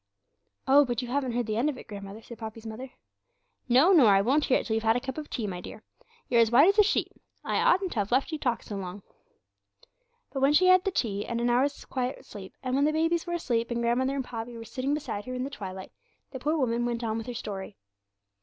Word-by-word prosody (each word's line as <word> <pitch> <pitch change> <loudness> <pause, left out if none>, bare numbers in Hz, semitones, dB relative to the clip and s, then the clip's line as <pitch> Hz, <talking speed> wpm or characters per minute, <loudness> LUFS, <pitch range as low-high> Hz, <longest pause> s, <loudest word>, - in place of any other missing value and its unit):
'Oh, 280 +2 +7
but 245 -2 -2
you 245 - -6
haven't 260 -2 -1
heard 240 0 0
the 215 0 -2
end 265 +6 +2
of 280 - -4
it, - - -11
grandmother,' 200 +1 -9
said 235 - -11
Poppy's 220 0 -8
mother. 230 +4 -7 0.8
'No, 265 +10 +6
nor 305 - +7
I 195 -1 +6
won't 265 +9 +2
hear 260 - +3
it - - -4
till 220 - -2
you've 225 - +1
had 225 0 +3
a - - +1
cup 265 0 -6
of 300 - -8
tea, 230 - -3
my 180 -3 -5
dear. 215 - -10 0.4
You're 235 -1 +4
as 225 - +4
white 275 - +6
as 400 +2 +2
a - - +9
sheet. 410 - 0 0.3
I - - -1
oughtn't 375 0 +3
to 225 - -2
have 205 +1 -2
let 265 +6 +2
you 315 - -3
talk 245 -5 -1
so 205 - -6
long.' 190 +1 -7 1.3
But 270 - -2
when 275 +2 +4
she 370 +5 +5
had 365 - +7
had 370 0 +5
the 390 - +1
tea, 205 - -1
and 235 - -2
an 240 0 +1
hour's 270 +4 +1
quiet 260 +1 -4
sleep, 195 -6 -10
and 255 -1 -2
when 280 +2 +3
the 305 - +3
babies 330 +2 0
were 345 - -2
asleep, 235 -9 -1
and 235 0 -2
grandmother 260 +3 +1
and 270 -2 -2
Poppy 235 0 -6
were 230 - -8
sitting 265 +5 -2
beside 210 -8 -5
her 255 0 -5
in 250 - -2
the 275 - -5
twilight, 190 -6 -7 0.4
the 260 - -6
poor 305 +5 0
woman 240 -4 0
went 240 0 -2
on 220 0 -1
with 225 - -8
her 245 - -5
story. 200 -3 -6
245 Hz, 260 wpm, -28 LUFS, 225-280 Hz, 1.3 s, a